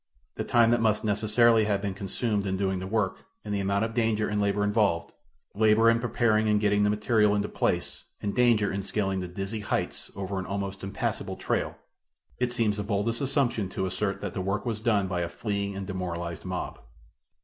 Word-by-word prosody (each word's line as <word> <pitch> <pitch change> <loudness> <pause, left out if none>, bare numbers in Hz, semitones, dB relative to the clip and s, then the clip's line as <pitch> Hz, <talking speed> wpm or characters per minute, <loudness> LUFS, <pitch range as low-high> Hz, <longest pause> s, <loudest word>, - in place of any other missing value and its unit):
The - - -3
time 115 -1 +4
that 120 -1 +3
must 110 -2 +2
necessarily 110 +2 +3
have 100 -2 +1
been 100 -1 -3
consumed 100 +2 -2
in 95 0 -1
doing 95 -1 0
the 95 - -5
work 105 -2 0 0.3
and 105 - -3
the 100 - 0
amount 100 +2 +1
of 115 - -5
danger 110 -2 +1
and 105 0 0
labor 100 0 +1
involved 105 -5 +1 0.4
labor 110 +2 +5
in 115 - +2
preparing 110 -2 +2
and 105 0 +3
getting 105 -1 +2
the 105 - +3
material 105 0 +3
into 105 0 0
place - - -2
and 100 -1 -2
danger 120 -4 +3
in 100 - -2
scaling 95 0 -1
the 90 - -4
dizzy 95 +4 -4
heights 105 - -3
over 100 0 -3
an 95 - -5
almost 100 0 -4
impassible 100 +1 -3
trail, - - -2 0.6
it 125 -1 +1
seems 115 -4 +1
the 105 - -2
boldest 105 +4 -1
assumption 130 -7 +1
to 95 - -2
assert 100 +1 -2
that 100 -3 -4
the - - -2
work 100 +2 -2
was 115 -3 -2
done 105 -4 +2
by 90 -1 -1
a 85 - -2
fleeing 100 +1 -3
and 95 0 -4
demoralized 85 -3 -4
mob. - - -4
105 Hz, 205 wpm, -27 LUFS, 95-110 Hz, 0.6 s, labor